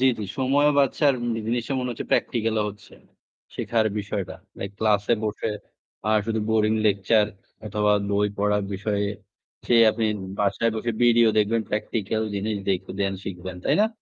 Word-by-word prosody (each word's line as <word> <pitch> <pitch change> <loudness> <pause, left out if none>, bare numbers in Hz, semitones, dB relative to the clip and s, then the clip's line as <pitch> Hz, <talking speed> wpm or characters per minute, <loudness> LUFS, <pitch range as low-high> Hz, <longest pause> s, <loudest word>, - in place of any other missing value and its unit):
জী, - - +3
জী। 105 - -3
সময়ও 140 +3 +3
বাঁচছে 140 +2 +1
আর 135 - 0 0.3
জিনিসটা 120 +3 -1
মনে 125 0 -2
হচ্ছে 115 - -5
প্র্যাকটিক্যাল 115 -2 +1
ও - - +2
হচ্ছে। 105 - -16 0.6
শিখার 115 -2 +1
বিষয়টা। 100 -2 -4 0.2
লাইক 100 - -4
ক্লাসে 105 0 +2
বসে 105 +1 -2 0.6
আর 110 0 +4
শুধু 110 -1 0
বোরিং 110 -1 +3
লেকচার 105 +1 +3 0.4
অথবা 105 0 +1 0.2
বই 105 +1 +2
পড়ার 105 0 +2
বিষয়ে 100 +1 -1 0.6
সে - - +3 0.2
আপনি 110 +1 -2 0.3
বাসায় 105 +3 +1
বসে 120 +2 -1
ভিডিও 120 -1 +5
দেখবেন 110 +2 +2
প্র্যাকটিক্যাল 105 0 -2
জিনিস 105 +1 -1
দেখবেন 95 +1 -1
শিখবেন। 90 -1 -6
তাই - - +3
না? 220 - +2
105 Hz, 155 wpm, -24 LUFS, 100-115 Hz, 0.6 s, ভিডিও